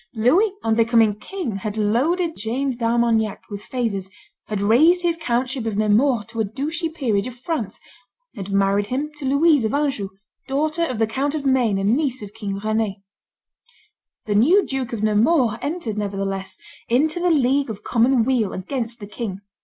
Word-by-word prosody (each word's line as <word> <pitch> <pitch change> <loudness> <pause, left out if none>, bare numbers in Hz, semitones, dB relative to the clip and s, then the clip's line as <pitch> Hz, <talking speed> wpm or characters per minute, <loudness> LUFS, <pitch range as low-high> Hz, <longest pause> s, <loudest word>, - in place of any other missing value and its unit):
Louis, 320 - +3
on 225 - +2
becoming 230 -1 +4
king, 345 - -4
had 210 +2 -5
loaded 310 - +1
James 245 +5 -2
d'Armagnac 230 -2 +1
with 205 -1 -5
favors; 220 -7 -3 0.4
had 210 -2 -2
raised 305 - +4
his 340 -1 +2
countship 255 -5 -2
of 210 -2 -2
Nemours 215 +2 +2
to 230 -1 -7
a - - +3
duchy 300 - -3
peerage 250 -10 -1
of 250 - -8
France; 245 - -4 0.6
had 200 -3 -6
married 200 +1 +2
him 280 +6 -2
to 290 - -6
Louise 285 0 +4
of 220 +4 0
Anjou, 275 -9 -1 0.4
daughter 305 +4 -1
of 255 -8 -2
the 225 - +3
Count 275 +7 -2
of 290 -2 -4
Maine 250 -6 +2
and 200 +4 +2
niece 260 -5 -1
of 205 0 -9
King 205 -3 -4
Rend. 215 -2 0 1.3
The 210 - -1
new 335 - +5
Duke 265 -3 -3
of 220 -3 -4
Nemours 225 +3 +3
entered, 285 - -3
nevertheless, 195 -1 -3 0.3
into 305 +8 +2
the 355 0 +2
League 275 -3 +2
of 210 -2 -7
Common 240 +1 +3
Weal 235 -5 +1
against 230 +3 -4
the 205 - -7
king. 205 -2 -5
235 Hz, 170 wpm, -22 LUFS, 210-280 Hz, 1.3 s, new